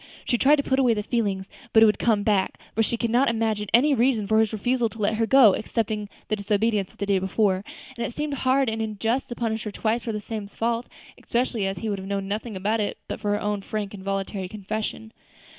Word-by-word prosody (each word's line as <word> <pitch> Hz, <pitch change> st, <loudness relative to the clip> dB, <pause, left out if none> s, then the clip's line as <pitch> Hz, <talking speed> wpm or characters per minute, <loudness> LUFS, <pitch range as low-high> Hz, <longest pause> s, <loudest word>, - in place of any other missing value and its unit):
She 240 Hz, -, +1 dB
tried 290 Hz, +3 st, +6 dB
to 280 Hz, -, -1 dB
put 265 Hz, 0 st, +1 dB
away 245 Hz, -4 st, +4 dB
the 210 Hz, -, -2 dB
feeling, 205 Hz, -5 st, -1 dB, 0.3 s
but 220 Hz, -, +7 dB
it -, -, +9 dB
would 215 Hz, -, +3 dB
come 215 Hz, -3 st, +2 dB
back; 200 Hz, -3 st, +1 dB
for 225 Hz, -, +1 dB
she 230 Hz, +1 st, 0 dB
could 230 Hz, -1 st, -1 dB
not 250 Hz, +3 st, +4 dB
imagine 220 Hz, -2 st, -1 dB
any 275 Hz, +6 st, +5 dB
reason 240 Hz, -4 st, +2 dB
for 220 Hz, +2 st, +3 dB
his 220 Hz, -1 st, +2 dB
refusal 235 Hz, +2 st, 0 dB
to 225 Hz, -, -13 dB
let 215 Hz, 0 st, +1 dB
her 225 Hz, +1 st, 0 dB
go, 255 Hz, -7 st, +7 dB
excepting 215 Hz, -1 st, -2 dB, 0.2 s
the 215 Hz, -, 0 dB
disobedience 205 Hz, -1 st, 0 dB
of -, -, -25 dB
the 200 Hz, -, -2 dB
day 195 Hz, -1 st, +2 dB
before, 190 Hz, 0 st, +1 dB, 0.3 s
and 235 Hz, -, -3 dB
it -, -, -3 dB
seemed 300 Hz, -1 st, -2 dB
hard 265 Hz, 0 st, +2 dB
and 225 Hz, 0 st, -1 dB
unjust 225 Hz, +4 st, -1 dB
to 240 Hz, -, -5 dB
punish 225 Hz, -2 st, -2 dB
her 210 Hz, -, -4 dB
twice 225 Hz, +3 st, 0 dB
for 230 Hz, -, -2 dB
the 210 Hz, -, -3 dB
same 210 Hz, -1 st, -5 dB
fault, 230 Hz, +3 st, -2 dB, 0.4 s
especially 235 Hz, -4 st, 0 dB
as 195 Hz, -1 st, -3 dB
he 220 Hz, -, -4 dB
would 200 Hz, -2 st, -2 dB
have 190 Hz, -, -7 dB
known 195 Hz, -1 st, -2 dB
nothing 215 Hz, +2 st, -4 dB
about 210 Hz, +4 st, 0 dB
it 210 Hz, -, -2 dB
but -, -, -5 dB
for 210 Hz, -1 st, -2 dB
her 205 Hz, -, 0 dB
own 205 Hz, -1 st, -1 dB
frank 210 Hz, 0 st, -4 dB
and 195 Hz, -2 st, -9 dB
voluntary 195 Hz, -1 st, -3 dB
confession. 215 Hz, +2 st, -5 dB
220 Hz, 245 wpm, -25 LUFS, 205-235 Hz, 0.4 s, it